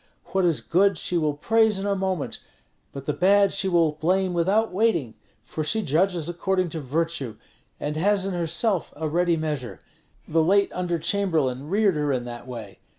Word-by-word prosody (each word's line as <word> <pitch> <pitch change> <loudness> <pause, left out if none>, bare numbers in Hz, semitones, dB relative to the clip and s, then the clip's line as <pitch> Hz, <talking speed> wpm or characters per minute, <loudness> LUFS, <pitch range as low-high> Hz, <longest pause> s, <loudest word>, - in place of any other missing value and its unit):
What 190 -1 +2
is 165 -4 +2
good 195 +1 +2
she 180 - -2
will 155 -3 +1
praise 220 +6 +2
in 195 - -4
a 200 -1 +1
moment, 190 -5 -2 0.5
but 140 -1 -8
the 150 - 0
bad 200 +3 +4
she 190 - 0
will 170 -3 +3
blame 180 +4 0
without 195 +5 +1
waiting; 190 - +1 0.3
for 155 +6 -4
she 220 +8 0
judges 170 +1 +1
according 185 +1 -1
to 160 - -5
virtue, 140 -4 -2 0.4
and 150 +1 -3
has 195 +3 +2
in 195 - -2
herself 175 +3 -1
a 155 +1 -3
ready 170 +2 +1
measure. 145 - -4 0.5
The 165 +1 +2
late 200 +5 +3
under 180 -1 -1
chamberlain 155 -7 -1
reared 200 -3 +2
her 150 -1 0
in 125 -2 -1
that 120 0 -8
way. 115 -6 -8
170 Hz, 180 wpm, -24 LUFS, 150-195 Hz, 0.5 s, bad